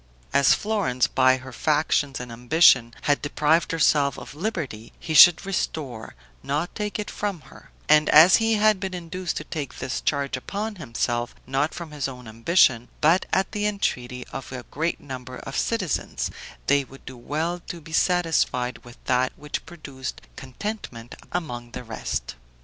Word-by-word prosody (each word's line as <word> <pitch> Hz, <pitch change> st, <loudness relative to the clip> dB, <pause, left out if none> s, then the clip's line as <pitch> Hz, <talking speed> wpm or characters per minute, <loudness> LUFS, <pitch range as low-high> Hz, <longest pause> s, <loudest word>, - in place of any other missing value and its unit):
As 140 Hz, -, +5 dB
Florence, 200 Hz, -, 0 dB
by 130 Hz, 0 st, +3 dB
her 130 Hz, 0 st, -11 dB
factions 145 Hz, -1 st, +1 dB
and 125 Hz, -1 st, -7 dB
ambition, 120 Hz, -1 st, +4 dB
had 145 Hz, -1 st, +2 dB
deprived 150 Hz, +3 st, +1 dB
herself 145 Hz, -4 st, +2 dB
of -, -, -9 dB
liberty, 150 Hz, -, -4 dB
he 160 Hz, -, -4 dB
should 170 Hz, +5 st, +8 dB
restore, 145 Hz, -11 st, -4 dB, 0.3 s
not 150 Hz, +5 st, -2 dB
take 210 Hz, -1 st, -3 dB
it 210 Hz, -, -4 dB
from 200 Hz, -5 st, -3 dB
her; -, -, -16 dB, 0.2 s
and 150 Hz, 0 st, +5 dB
as 165 Hz, +5 st, +8 dB
he 225 Hz, 0 st, +2 dB
had 215 Hz, -1 st, +3 dB
been 190 Hz, -1 st, -4 dB
induced 180 Hz, 0 st, -4 dB
to -, -, -4 dB
take 150 Hz, -3 st, -6 dB
this 125 Hz, -, -3 dB
charge 140 Hz, -2 st, 0 dB
upon 205 Hz, +10 st, -4 dB
himself, 120 Hz, -4 st, -2 dB
not 135 Hz, +4 st, -1 dB
from 170 Hz, -3 st, -7 dB
his 145 Hz, -3 st, -2 dB
own 125 Hz, -3 st, -9 dB
ambition, 115 Hz, +1 st, +3 dB
but 165 Hz, +5 st, +3 dB
at 190 Hz, 0 st, +1 dB
the 210 Hz, -1 st, -1 dB
entreaty 125 Hz, -11 st, -2 dB
of 135 Hz, -, -7 dB
a 130 Hz, -1 st, -6 dB
great 165 Hz, +4 st, -1 dB
number 130 Hz, -2 st, -8 dB
of 135 Hz, -, -8 dB
citizens, 205 Hz, -9 st, -1 dB, 0.3 s
they 140 Hz, 0 st, +3 dB
would 135 Hz, +1 st, -16 dB
do 130 Hz, -, -8 dB
well 155 Hz, +8 st, -3 dB
to 175 Hz, -, -6 dB
be 160 Hz, 0 st, -12 dB
satisfied 160 Hz, -8 st, +1 dB
with 120 Hz, -1 st, -13 dB
that 130 Hz, 0 st, +2 dB
which 150 Hz, 0 st, -6 dB
produced 140 Hz, -6 st, -7 dB
contentment 130 Hz, -, -7 dB, 0.2 s
among 120 Hz, -9 st, -4 dB
the 125 Hz, -, -6 dB
rest. 115 Hz, -2 st, -4 dB
145 Hz, 165 wpm, -24 LUFS, 125-175 Hz, 0.3 s, should